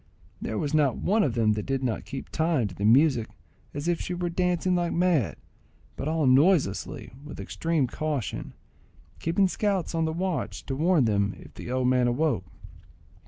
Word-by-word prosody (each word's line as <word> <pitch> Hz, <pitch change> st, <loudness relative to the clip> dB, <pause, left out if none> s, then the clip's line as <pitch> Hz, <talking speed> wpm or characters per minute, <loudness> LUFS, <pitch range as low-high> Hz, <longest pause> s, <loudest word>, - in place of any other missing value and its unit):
There 110 Hz, -, -3 dB
was 145 Hz, +4 st, -2 dB
not 145 Hz, -5 st, +3 dB
one 215 Hz, +4 st, +2 dB
of 130 Hz, -, +1 dB
them 110 Hz, -2 st, +3 dB
that 105 Hz, 0 st, -4 dB
did 135 Hz, -1 st, -1 dB
not 120 Hz, -4 st, -2 dB
keep 135 Hz, -2 st, -7 dB
time 160 Hz, -8 st, +1 dB
to 95 Hz, -, -8 dB
the 100 Hz, +3 st, -3 dB
music 125 Hz, 0 st, +4 dB, 0.4 s
as 145 Hz, +3 st, -5 dB
if 175 Hz, -1 st, +1 dB
she 180 Hz, -, -3 dB
were 175 Hz, -1 st, -2 dB
dancing 180 Hz, +1 st, +1 dB
like 175 Hz, -1 st, 0 dB
mad, 170 Hz, -, +2 dB, 0.6 s
but 135 Hz, -, -4 dB
all 160 Hz, -1 st, +1 dB
noiselessly 135 Hz, -, +2 dB
and 135 Hz, +3 st, -16 dB
with 150 Hz, -, -9 dB
extreme 165 Hz, -4 st, -1 dB
caution, 145 Hz, -1 st, -3 dB, 0.6 s
keeping 180 Hz, +4 st, +2 dB
scouts 195 Hz, -3 st, -1 dB
on 165 Hz, -1 st, +1 dB
the 160 Hz, -, -1 dB
watch 180 Hz, +1 st, -3 dB
to 135 Hz, -, -3 dB
warn 160 Hz, -1 st, +3 dB
them 100 Hz, -2 st, +1 dB
if -, -, -14 dB
the -, -, -8 dB
old 130 Hz, 0 st, +1 dB
man 125 Hz, -1 st, +3 dB
awoke. 120 Hz, -, 0 dB
150 Hz, 185 wpm, -27 LUFS, 125-170 Hz, 0.6 s, music